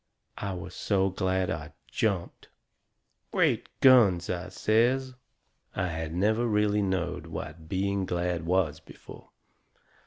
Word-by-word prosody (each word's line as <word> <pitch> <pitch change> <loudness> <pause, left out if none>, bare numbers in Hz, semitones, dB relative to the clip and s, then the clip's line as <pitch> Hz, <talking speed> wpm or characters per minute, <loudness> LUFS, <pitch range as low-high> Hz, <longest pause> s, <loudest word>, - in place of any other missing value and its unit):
I 100 -1 -3
was 90 - -7
so 95 -1 +1
glad 95 0 0
I - - -5
jumped. 100 -6 -2 0.8
"Great - - +1
guns!" 100 -11 +6
I 90 0 -4
says. 125 +4 +1 0.6
I 90 -1 -1
had 80 -1 -4
never 110 +7 +1
really 105 -1 +2
knowed 95 -3 -2
what 80 +1 -7
being 100 0 -1
glad 85 -1 -1
was 85 -3 +1
before. - - -14
95 Hz, 120 wpm, -28 LUFS, 85-105 Hz, 0.8 s, guns